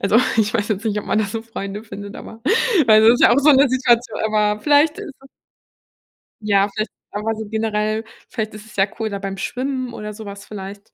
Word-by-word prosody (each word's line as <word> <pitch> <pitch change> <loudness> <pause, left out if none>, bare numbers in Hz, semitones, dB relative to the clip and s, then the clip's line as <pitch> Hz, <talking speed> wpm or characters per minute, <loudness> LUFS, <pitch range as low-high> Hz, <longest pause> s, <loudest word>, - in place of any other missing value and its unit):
Also, 200 +3 +2 0.2
ich 220 0 +2
weiß 210 -2 -1
jetzt 215 +1 -2
nicht, 210 -1 0
ob - - -6
man 215 - +1
da 215 - +2
so 220 +3 -5
Freunde 205 -2 -6
findet, 205 -2 -9
aber 225 - -10 0.5
weil 215 -1 +7
das 230 +2 +7
ist - - 0
ja - - +7
auch 265 - +4
so 295 +2 +5
'ne 275 -1 +6
Situation, 240 -3 +1
aber 210 -1 +1
vielleicht 295 +3 +3
ist - - -7
es 270 - -16 1.2
Ja, 200 -1 +3
vielleicht 215 +1 -2 0.2
einfach 215 +2 -2
so 220 0 -6
generell 215 0 -1 0.3
vielleicht 220 -2 -4
ist 210 0 -11
es 220 - -16
ja 195 +1 +3
cool 220 -1 -1
da 200 -1 -4
beim 195 0 -5
Schwimmen 255 +3 -3
oder 210 0 -6
sowas 200 -2 -9
vielleicht. 200 -1 -9
215 Hz, 220 wpm, -20 LUFS, 205-230 Hz, 1.2 s, weil